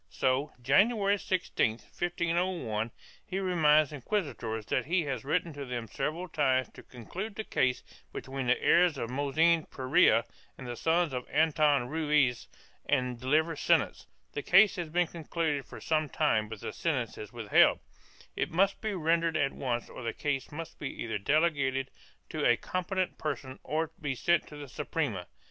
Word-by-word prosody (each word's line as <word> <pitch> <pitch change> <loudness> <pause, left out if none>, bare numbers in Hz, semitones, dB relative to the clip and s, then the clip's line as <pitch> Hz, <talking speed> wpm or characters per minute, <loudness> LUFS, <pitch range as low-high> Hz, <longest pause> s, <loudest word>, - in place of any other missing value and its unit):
So, 135 +3 0
January 200 - +3
16, 180 -13 0
1501, 170 -6 -2 0.3
he 190 - -5
reminds 155 -6 +3
inquisitors 125 - -3
that - - 0
he 175 +1 +2
has 135 -5 -3
written 165 +3 -1
to 145 -1 -6
them 120 -3 -4
several 155 - -3
times 130 -6 +1
to - - -13
conclude 185 - -7
the 220 - -3
case 125 -10 0 0.3
between 135 -1 -5
the 125 - +3
heirs 175 -4 +4
of 115 -2 -4
Mossen 155 +4 +2
Perea 130 -3 +3 0.3
and 130 - -9
the 120 -1 -5
sons 165 +2 +1
of 125 -1 -4
Anton 150 -3 +3
Ruiz 150 -4 +1 0.4
and 125 -4 0
deliver 155 +6 +1
sentence; - - +1 0.3
the 145 - -3
case 195 +7 +6
has 170 -3 -3
been 175 +3 +2
concluded 160 -3 -2
for - - -10
some 155 -2 0
time 110 -3 +1
but 110 -2 -8
the - - -5
sentence 130 -9 -1
is 105 -1 -8
withheld; 115 -4 +4 0.6
it - - -1
must 195 +4 +1
be 215 -2 -2
rendered 165 -1 +1
at 140 -2 +1
once 120 -3 -2
or - - -10
the 115 -1 -3
case 140 -3 -2
must 165 +2 -8
be 140 - -3
either 115 -3 -3
delegated 140 0 +1 0.4
to - - -3
a - - +5
competent 185 0 -2
person 140 -3 -4
or 160 +3 -1
be 140 -3 -2
sent 170 +6 +2
to 150 - -11
the 145 -1 -8
Suprema. 120 - -3
150 Hz, 165 wpm, -30 LUFS, 130-170 Hz, 0.6 s, case